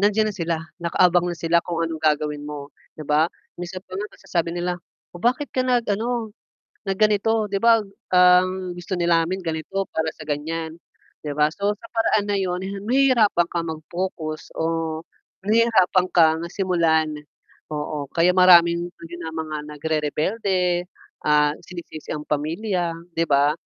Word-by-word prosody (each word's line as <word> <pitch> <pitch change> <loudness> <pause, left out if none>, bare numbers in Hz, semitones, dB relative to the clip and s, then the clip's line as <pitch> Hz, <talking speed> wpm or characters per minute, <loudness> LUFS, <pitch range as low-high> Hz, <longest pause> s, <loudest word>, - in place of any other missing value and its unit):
nandiyan 210 +2 +3
na - - -15
sila, 170 -2 -1 0.3
nakaabang 175 +1 +3
na 175 - -5
sila, 165 +1 +2
kung 170 -1 -2
anong 165 -1 -4
gagawin 150 -1 +1
mo, 145 -1 -7 0.3
'di - - -6
ba? 150 +1 +4 0.4
Minsan 185 +1 -6
pa 185 - -21
nga 210 +2 -3
masasabi 170 -1 -2
nila, 175 0 -1 0.4
"oh, 175 - -10
bakit 255 +4 +1
ka 255 - +2
nag 245 -2 +2
ano, 225 +1 -1 0.5
nag 195 - 0
ganito? 215 +1 +2
'Di 200 - 0
ba, 230 -1 +6 0.3
ang 180 +1 +4
gusto 175 +2 -4
din 170 0 0
namin 170 +3 +2
ganito, 165 +4 -2
para 160 0 -1
sa - - -11
gan'yan", 160 +2 -3 0.5
'di 145 - -2
ba? 150 0 +3
So, 205 +1 0
sa 230 - -13
paraan 215 -2 +2
na 200 - +2
'yon, 180 -1 -1 0.2
nahihirapan 235 -9 +3
ka 170 - -1
mag-focus 160 0 -5
o 160 -1 -1 0.5
nahihirapan 210 -5 +4
kang 160 -1 +5
simulan 165 -5 +2 0.6
oo. 150 -1 -3
Kaya 170 +1 +4
maraming 175 -1 +6 0.5
mga 155 -1 -4
nagrerebelde, 175 +5 -1 0.4
ah, 150 0 +4
sinisisi 170 -3 -9
ang 150 - -5
pamilya, 170 +4 -1 0.2
'di 165 - +1
ba? 145 +1 +4
175 Hz, 150 wpm, -23 LUFS, 160-195 Hz, 0.6 s, ba